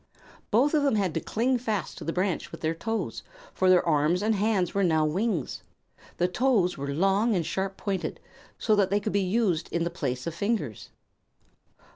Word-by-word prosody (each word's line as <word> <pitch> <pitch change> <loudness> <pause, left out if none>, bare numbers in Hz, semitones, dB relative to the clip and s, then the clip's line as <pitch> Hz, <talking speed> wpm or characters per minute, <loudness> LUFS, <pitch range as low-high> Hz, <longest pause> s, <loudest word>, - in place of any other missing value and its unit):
Both 260 +8 +3
of 305 - +4
them 280 -5 +2
had 195 -6 0
to - - 0
cling 245 +8 0
fast 215 - -3
to - - -7
the 165 - -2
branch 185 0 -1
with - - -9
their 160 0 0
toes, 225 +7 -3 0.3
for 185 - +2
their 180 -1 +5
arms 160 +4 +2
and 220 +1 +2
hands 200 -4 +1
were 200 - +1
now 160 -3 +3
wings. 180 - -1 0.6
The 175 - +2
toes 200 -2 +2
were 140 0 -4
long 195 +8 +2
and 170 -3 0
sharp 195 +2 -3
pointed, 195 -3 -3 0.4
so 215 - +2
that 195 -2 +3
they 200 +2 +2
could 210 +1 -3
be 200 - +2
used 185 -4 0
in 170 - 0
the 170 - -2
place 130 -6 -3
of 170 - -3
fingers. 180 - -2
190 Hz, 195 wpm, -27 LUFS, 165-215 Hz, 0.6 s, their